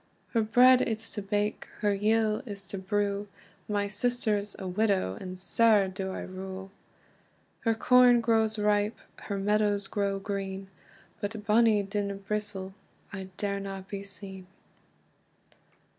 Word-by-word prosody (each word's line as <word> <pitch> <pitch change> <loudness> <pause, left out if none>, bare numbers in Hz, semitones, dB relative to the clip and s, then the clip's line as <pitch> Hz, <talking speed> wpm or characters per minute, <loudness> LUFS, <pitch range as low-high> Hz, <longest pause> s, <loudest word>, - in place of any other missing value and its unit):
"Her 230 - +2
bread 250 +4 +6
it's 220 -1 -3
to 210 - -3
bake, 205 +1 -1
her 205 -1 +3
yill 215 +1 +2
is 200 -2 -7
to 195 - -4
brew; 200 +1 -1 0.4
My 205 -1 0
sister's 210 -1 -1
a 190 - -5
widow, 190 - +1
and 185 0 -6
sair 210 0 +4
do 190 0 -4
I - - -5
rue. 190 +1 -7 0.9
"Her 225 -1 +1
corn 250 +1 +6
grows 220 -1 +2
ripe, 210 +1 +1 0.3
her 200 - -2
meadows 205 0 +1
grow 200 -1 -1
green, 195 -1 -4 0.5
But 205 +2 -3
in 215 - -6
bonnie 215 -1 +4
Dinnibristle 200 -1 -3 0.4
I 190 -2 -6
darena 195 -1 -3
be 200 -1 -5
seen." 195 -1 -9
205 Hz, 130 wpm, -29 LUFS, 195-215 Hz, 0.9 s, bread